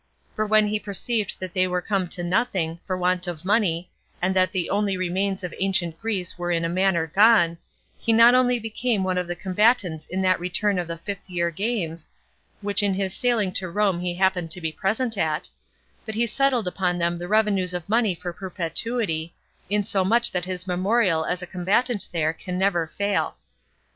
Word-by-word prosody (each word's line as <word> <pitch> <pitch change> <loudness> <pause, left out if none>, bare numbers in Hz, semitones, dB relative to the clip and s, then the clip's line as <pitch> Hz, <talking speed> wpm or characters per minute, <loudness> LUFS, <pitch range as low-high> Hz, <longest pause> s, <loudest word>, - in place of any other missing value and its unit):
For 215 0 -1
when 215 0 +4
he 210 0 -1
perceived 210 0 -1
that 185 -2 -5
they 185 0 +2
were 180 0 -1
come 190 0 -1
to 175 +1 -4
nothing, 175 -3 0
for 185 -1 -1
want 180 0 0
of 175 -1 -6
money, 185 -4 +1 0.3
and 185 +2 0
that 185 0 +3
the 180 -3 -1
only 200 -1 0
remains 190 +2 -1
of 180 - -5
ancient 180 -4 +1
Greece 195 -5 -3
were 175 0 -3
in 165 -1 0
a - - -1
manner 180 -2 +1
gone, 175 -1 +4 0.4
he 230 - 0
not 230 +2 +7
only 250 -1 +4
became 225 -1 -1
one 185 -1 0
of 180 - -3
the 175 - -3
combatants 190 -3 +1
in 190 +1 -2
that 185 -1 +3
return 180 +2 0
of 175 - -3
the 170 0 -4
fifth 195 +3 -7
year 170 -1 0
games, 170 -5 -3 0.5
which 205 +1 +3
in 200 -2 +1
his 190 -1 -2
sailing 230 -6 +1
to 185 -1 -1
Rome 195 -1 +1
he 175 0 -2
happened 185 -2 +1
to 170 - +3
be 160 -2 -2
present 220 +5 -1
at, 155 -1 +1 0.6
but 220 - -6
he 235 +2 +2
settled 245 -2 +1
upon 180 -1 -1
them 170 0 0
revenues 190 -1 +1
of 175 -2 -5
money 220 -3 +2
for 175 +1 -6
perpetuity, 175 -1 -3 0.3
insomuch 205 +3 +3
that 180 -1 -1
his 185 0 -4
memorial 185 -2 +1
as 180 0 -2
a - - -4
combatant 195 +5 0
there 160 -2 0
can 180 +2 -6
never 185 -4 +1
fail. 200 +4 -1
185 Hz, 190 wpm, -24 LUFS, 175-210 Hz, 0.6 s, not